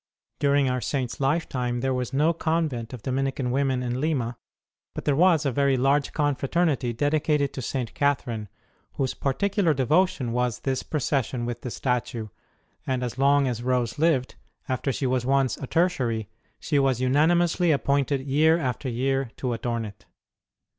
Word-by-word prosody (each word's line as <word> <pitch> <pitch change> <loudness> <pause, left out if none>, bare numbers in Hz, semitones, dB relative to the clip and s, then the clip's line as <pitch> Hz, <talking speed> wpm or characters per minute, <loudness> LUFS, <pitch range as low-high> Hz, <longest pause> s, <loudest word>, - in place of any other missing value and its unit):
During 140 -1 +3
our 125 0 0
Saint 130 -3 -2
s - - -9
lifetime 130 -4 -1
there 135 0 0
was 125 -2 -2
no 150 +5 +2
convent 160 -8 -1
of 125 -5 -8
Dominican 135 -1 -1
women 130 -1 +1
in 125 +1 -2
Lima, 130 -7 -1 0.6
but - - -6
there 145 - +2
was 165 -1 +4
a 140 - +2
very 140 +1 +2
large 135 +2 +2
confraternity 145 -2 0
dedicated 145 +3 +1
to 130 - -5
St. 125 -2 -3
Catherine, 120 -7 -1 0.4
whose 130 -2 -1
particular 175 +4 +1
devotion 140 -1 +1
was 125 -2 -1
this 130 -1 -1
procession 135 -4 -1
with 120 0 -4
the 125 - -5
statue; 120 -3 -2 0.6
and 130 -1 -1
as 125 +1 -4
long 140 0 +4
as 120 -2 -2
Rose 125 -1 -1
lived, 150 -6 +2 0.3
after 130 +1 -1
she 135 - -2
was 130 -1 +1
once 135 0 +2
a 135 - -6
Tertiary, 125 - 0 0.3
she 145 -3 +1
was 135 -3 +2
unanimously 165 +6 +3
appointed 140 0 +1
year 150 +4 +3
after 130 -3 -2
year 135 +2 0
to 125 -2 -2
adorn 115 0 -2
it. 105 -1 -12
135 Hz, 160 wpm, -25 LUFS, 125-145 Hz, 0.6 s, was